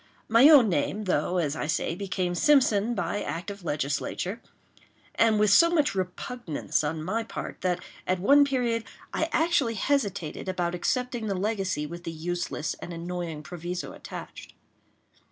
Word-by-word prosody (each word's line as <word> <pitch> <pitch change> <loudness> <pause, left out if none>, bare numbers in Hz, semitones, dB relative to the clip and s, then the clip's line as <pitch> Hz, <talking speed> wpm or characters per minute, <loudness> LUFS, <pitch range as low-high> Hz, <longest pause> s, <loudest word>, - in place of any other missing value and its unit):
My 230 +6 +7
own 280 -7 +8
name, 190 +4 0
though, 180 -1 0
as 155 -4 0
I 150 - -3
say, 160 +1 0
became 185 -1 -2
Simpson, 240 - +3
by 205 +1 -2
act 175 +5 -4
of 200 -2 -10
Legislature, 150 - -2 0.7
and 220 -2 +3
with 210 -1 +4
so 335 +11 +7
much 310 -8 +2
repugnance 185 -2 -2
on 155 +1 -2
my 215 +7 -1
part, 225 - -7
that, 180 -1 -1 0.2
at 185 0 +1
one 280 +10 +6
period, 245 -5 0 0.3
I 320 - 0
actually 310 -8 +2
hesitated 200 - -1
about 175 -2 -1
accepting 240 +5 -1
the 200 - -1
legacy 195 -6 -1
with 170 +3 -8
the 165 - -4
useless 165 -1 -3
and - - -7
annoying 170 -2 -5
proviso 175 +1 -5
attached. - - -9
190 Hz, 155 wpm, -27 LUFS, 175-230 Hz, 0.7 s, own